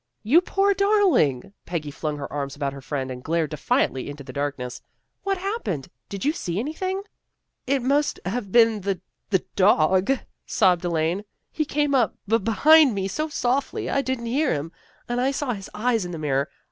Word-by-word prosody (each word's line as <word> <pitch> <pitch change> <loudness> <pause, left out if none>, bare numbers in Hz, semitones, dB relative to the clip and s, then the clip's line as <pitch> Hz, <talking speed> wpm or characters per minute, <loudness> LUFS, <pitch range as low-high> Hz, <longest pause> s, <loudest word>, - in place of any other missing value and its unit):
" - - -51
You 340 - +8
poor 395 +2 +2
darling! 375 - +2
" - - -54
Peggy 155 -4 -3
flung 150 +1 -3
her 140 - -6
arms 140 -1 -3
about 140 -2 -2
her 140 - -9
friend 135 -1 -3
and 125 0 -7
glared 160 -2 0
defiantly 135 -3 0
into 145 0 -8
the - - -10
darkness. 140 -4 -3 0.2
" - - -52
What 390 -1 0
happened? 360 - -3 0.2
Did 200 +4 -5
you 300 - +3
see 175 - -4
anything? 370 - -2 0.2
" - - -54
" - - -53
It 255 - -5
must 290 +3 +1
have 200 +1 -3
been 225 -2 +5
the 195 -1 -1 0.3
the 190 -3 +1
dog," 190 +2 +4 0.4
sobbed 180 -1 +3
Elaine. 170 +3 0 0.2
" - - -52
He 310 - -1
came 295 0 0
up 245 -7 +2
be 225 +3 +3
behind 265 +6 +5
me 195 -1 -1
so 305 +11 -2
softly, 265 -1 -1
I 275 - +2
didn't 260 -3 -3
hear 270 +5 +1
him, 150 +2 -2 0.4
and 240 +1 -1
I 260 - +2
saw 275 -2 -1
his 195 -3 -8
eyes 225 0 +1
in 175 - -5
the - - -4
mirror. 140 -2 0
200 Hz, 205 wpm, -24 LUFS, -, 0.4 s, You